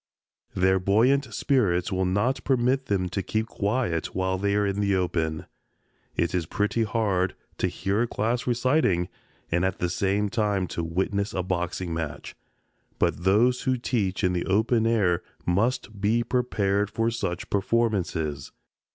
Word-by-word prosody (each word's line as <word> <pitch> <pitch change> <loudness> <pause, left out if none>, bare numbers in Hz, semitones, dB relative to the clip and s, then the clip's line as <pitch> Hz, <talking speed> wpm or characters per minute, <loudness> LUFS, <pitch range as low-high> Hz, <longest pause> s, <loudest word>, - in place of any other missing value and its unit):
Their 95 +1 +3
buoyant 115 +9 +3
spirits 95 -11 +1
will 95 0 0
not 105 +8 0
permit 130 +1 +1
them 95 -2 0
to 100 - -2
keep 110 +4 -1
quiet 105 -5 -1
while 95 0 0
they 100 +1 +1
are 105 0 +2
in 100 0 -1
the 100 -1 +2
open. 80 -4 -1 0.7
It 85 - 0
is 85 -4 -1
pretty 105 +5 0
hard 100 -4 0 0.2
to - - +2
hear 100 +3 -1
a 120 - +1
class 115 +3 -1
reciting 120 - +2 0.4
and 85 +2 +2
at 95 0 0
the 90 - -1
same 100 +3 +1
time 105 -4 0
to 85 - -3
witness 95 +5 -1
a 90 - 0
boxing 90 -1 -2
match, 80 -3 -5 0.6
but 85 - 0
those 120 +6 +4
who 130 -1 +1
teach 105 -6 -1
in 90 -1 +2
the 90 - -2
open 110 +4 +2
air 100 -7 +2 0.2
must 105 +2 0
be 115 +4 +2
prepared 105 -5 0
for 115 +2 0
such 95 -6 -4
performances. 95 -9 0
100 Hz, 155 wpm, -26 LUFS, 90-115 Hz, 0.7 s, those